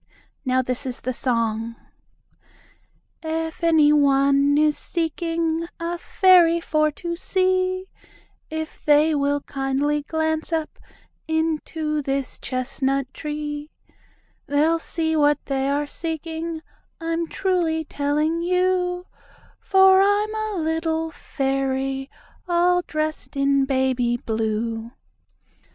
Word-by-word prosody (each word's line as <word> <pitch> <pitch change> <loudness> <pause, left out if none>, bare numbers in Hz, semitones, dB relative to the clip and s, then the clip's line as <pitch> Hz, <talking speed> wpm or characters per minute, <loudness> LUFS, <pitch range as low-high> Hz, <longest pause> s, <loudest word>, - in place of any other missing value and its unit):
Now 260 -1 +1
this 255 +2 -3
is 250 - -4
the 255 - -2
song: 230 -2 -1 1.5
"If 320 +1 -4
any 315 -3 +5
one 280 0 +4
is 300 0 +3
seeking 330 0 -2
A 335 +1 -2
fairy 355 -3 +5
for 310 -2 +1
to 340 +2 -4
see, 370 +1 0 0.6
If 315 0 -6
they 300 +1 +4
will 285 0 +1
kindly 275 +2 -1
glance 315 +2 -2
up 320 -2 -2 0.5
Into 320 -1 -1
this 275 -1 -3
chestnut 270 +1 -2
tree 295 -1 -5 0.8
They'll 310 +4 +2
see 320 -1 -1
what 295 -1 +4
they 270 0 -1
are 290 +1 0
seeking, 325 +1 -5 0.4
I'm 330 0 -2
truly 345 -5 0
telling 300 +4 0
you, 360 0 +1 0.5
For 380 0 +5
I'm 410 +2 +2
a 435 -1 -3
little 320 0 -1
fairy 270 -1 -2 0.4
All 355 0 +3
dressed 310 -2 -3
in 275 0 +3
baby 260 -3 +1
blue." 225 +1 -2
310 Hz, 105 wpm, -23 LUFS, 275-335 Hz, 1.5 s, any